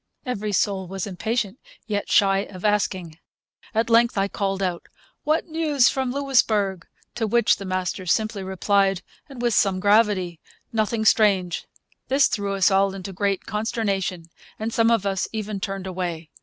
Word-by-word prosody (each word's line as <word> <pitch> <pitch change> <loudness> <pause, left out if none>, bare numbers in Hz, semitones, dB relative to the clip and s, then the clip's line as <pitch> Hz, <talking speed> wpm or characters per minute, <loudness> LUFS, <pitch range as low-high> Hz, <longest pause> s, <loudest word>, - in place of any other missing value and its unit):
Every 215 -5 -3
soul 195 -1 0
was 190 0 -4
impatient, 215 +3 -2 0.3
yet 205 -2 -3
shy 195 -1 +4
of 185 0 -9
asking. 190 -6 0 0.6
At 225 +1 +2
length 230 -1 +4
I 195 0 +2
called 195 -1 -2
out, 180 -2 -3 0.4
'What 310 +2 +1
news 310 -5 +2
from 265 -2 -1
Louisbourg?' 220 -9 +1 0.3
To 225 -2 -2
which 235 +2 +3
the 195 - -7
master 185 0 -3
simply 215 +3 0
replied, 195 0 +1 0.3
and 255 -3 -8
with 240 -1 +2
some 195 -3 +2
gravity, 200 -4 +2 0.3
'Nothing 220 0 0
strange.' 195 -5 +3 0.4
This 275 +1 +4
threw 200 -1 -1
us 195 +1 +3
all 195 0 +2
into 195 0 -7
great 195 0 -1
consternation, 200 -5 -2 0.3
and 220 +1 -4
some 230 0 +3
of 230 -4 +2
us 195 -2 0
even 215 -2 -3
turned 195 0 -4
away. 175 -4 -4
200 Hz, 155 wpm, -23 LUFS, 190-225 Hz, 0.6 s, shy